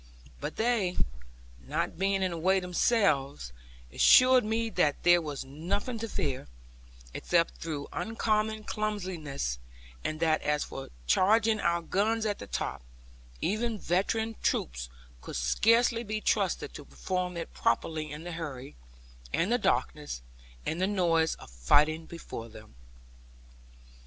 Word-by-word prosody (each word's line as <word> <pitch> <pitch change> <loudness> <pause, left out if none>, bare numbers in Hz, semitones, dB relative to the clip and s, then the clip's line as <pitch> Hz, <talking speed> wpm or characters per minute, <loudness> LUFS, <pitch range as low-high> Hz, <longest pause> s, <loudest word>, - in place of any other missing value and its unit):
But 150 +2 -4
they, 220 -6 +1 0.7
not 165 +4 -2
being 195 0 +2
in 185 - 0
the 170 - -4
way 190 +3 +3
themselves, 155 - +1 0.4
assured 255 - +7
me 225 +1 -1
that 150 -7 +1
there 175 0 +6
was 145 -4 -5
nothing 195 - -3
to 225 0 -4
fear, 140 - -2 0.7
except 170 -1 +1
through 150 -3 -4
uncommon 220 -1 0
clumsiness; 180 - -3 0.4
and 155 - -2
that 160 -1 +2
as 150 0 +1
for 135 - -7 0.2
charging 215 - +4
our 170 -2 +1
guns 215 +6 +1
at 205 -1 -1
the 100 - -8
top, - - -3 0.6
even 225 +2 0
veteran 215 +5 0
troops - - -1 0.3
could - - -7
scarcely 230 - +3
be 215 -1 -3
trusted - - 0
to - - -9
perform 180 -1 -3
it 165 - -6
properly 155 +5 0
in 150 +2 -7
the 175 - -6
hurry, 145 - -6 0.6
and 185 - +1
the 245 - +3
darkness, 150 - -1 0.4
and 165 +3 -2
the 185 - +3
noise 170 -5 +2
of - - -14
fighting 150 - +3
before 115 -8 -7
them. 105 - -13
175 Hz, 135 wpm, -29 LUFS, 150-215 Hz, 0.7 s, assured